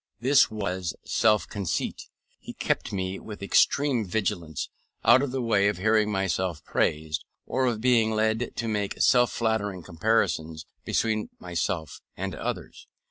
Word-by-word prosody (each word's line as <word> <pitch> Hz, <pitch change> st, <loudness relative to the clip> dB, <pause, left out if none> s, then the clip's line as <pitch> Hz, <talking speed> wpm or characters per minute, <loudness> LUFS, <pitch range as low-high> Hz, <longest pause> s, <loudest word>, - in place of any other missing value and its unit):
This 130 Hz, +4 st, +5 dB
was 95 Hz, -5 st, -3 dB
self 105 Hz, -2 st, +2 dB
conceit. 100 Hz, -5 st, -3 dB, 0.3 s
He -, -, -9 dB
kept -, -, -1 dB
me, 95 Hz, 0 st, -3 dB
with 105 Hz, -2 st, -9 dB
extreme 135 Hz, +4 st, +3 dB
vigilance, 90 Hz, -6 st, -2 dB, 0.4 s
out 125 Hz, +3 st, +7 dB
of 140 Hz, -, -1 dB
the 130 Hz, 0 st, -2 dB
way 100 Hz, -4 st, +3 dB
of 105 Hz, -, 0 dB
hearing 110 Hz, +2 st, +2 dB
myself 95 Hz, -4 st, -1 dB
praised, 75 Hz, -1 st, 0 dB, 0.2 s
or 130 Hz, 0 st, 0 dB
of 115 Hz, -3 st, -1 dB
being 120 Hz, -3 st, +4 dB
led 110 Hz, +2 st, 0 dB
to 115 Hz, -, -3 dB
make 105 Hz, -2 st, -2 dB
self 125 Hz, -1 st, +4 dB
flattering 105 Hz, -5 st, -1 dB
comparisons 85 Hz, -4 st, 0 dB, 0.2 s
between 110 Hz, -1 st, 0 dB
myself 85 Hz, -2 st, -3 dB, 0.2 s
and -, -, -3 dB
others. -, -, -5 dB
105 Hz, 140 wpm, -26 LUFS, 90-115 Hz, 0.4 s, out